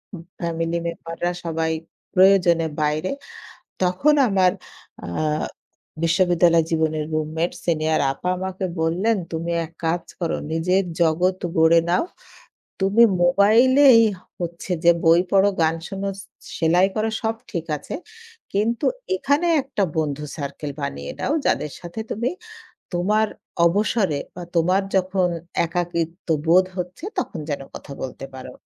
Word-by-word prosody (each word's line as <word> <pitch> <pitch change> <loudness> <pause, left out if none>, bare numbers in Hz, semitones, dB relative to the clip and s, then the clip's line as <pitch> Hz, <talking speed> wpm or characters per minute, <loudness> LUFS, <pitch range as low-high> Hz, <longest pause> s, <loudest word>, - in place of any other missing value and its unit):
উ - - -7 0.2
family 165 0 -1
মেম্বাররা 170 +1 -3
সবাই 160 0 -1 0.4
প্রয়োজনে 180 -4 +5
বাইরে। 150 +4 0 0.7
তখন 185 +12 +3
আমার 185 -2 +3 0.5
আ - - -5 1.0
বিশ্ববিদ্যালয় 170 -1 +4
জীবনের 160 -1 0
রুমমেট, 155 +2 -1 0.2
সিনিয়র 160 -2 +1
আপা 160 +6 -5
আমাকে 190 0 -4 0.2
বললেন, 180 +8 +1 0.2
"তুমি 165 +1 -3 0.2
এক 160 - -20
কাজ 170 +1 0 0.2
করো, 170 - 0 0.2
নিজের 180 +4 +2 0.2
জগৎ 175 +3 +2 0.2
গড়ে 160 +1 +6
নাও। 180 - +2 0.8
তুমি 200 +5 +5 0.2
মোবাইলেই 230 +8 +6 0.4
হচ্ছে 170 +1 -5
যে 170 - +7
বই 165 +1 +6
পড়ো, 195 +1 +5
গান 160 0 +3
শুনো, 195 -1 -4
সে - - -10 0.3
সেলাই 175 +3 +4
করো, 220 +1 0
সব 225 0 0 0.2
ঠিক 170 -4 -3
আছে। 145 - -9 0.6
কিন্তু 225 +7 0 0.3
এখানে 285 +2 +1
একটা 260 -6 -2
বন্ধু 150 -2 -1
সার্কেল 145 0 -5
বানিয়ে 70 - -4
নাও, 280 - 0
যাদের 150 - +1
সাথে 175 +5 -8
তুমি 235 +4 -1 0.6
তোমার 210 +5 +2 0.4
অবসরে 195 -3 +1 0.2
বা 180 - -7
তোমার 180 +4 +3
যখন 185 -1 +1 0.4
একাকিত্ব 170 0 -3 0.2
বোধ 180 +3 +6
হচ্ছে, 180 - -5
তখন 365 - -2
যেন 145 - -2
কথা 140 - -9
বলতে 130 +1 -6
পারো।" 130 -1 -8
175 Hz, 130 wpm, -22 LUFS, 160-195 Hz, 1.0 s, যে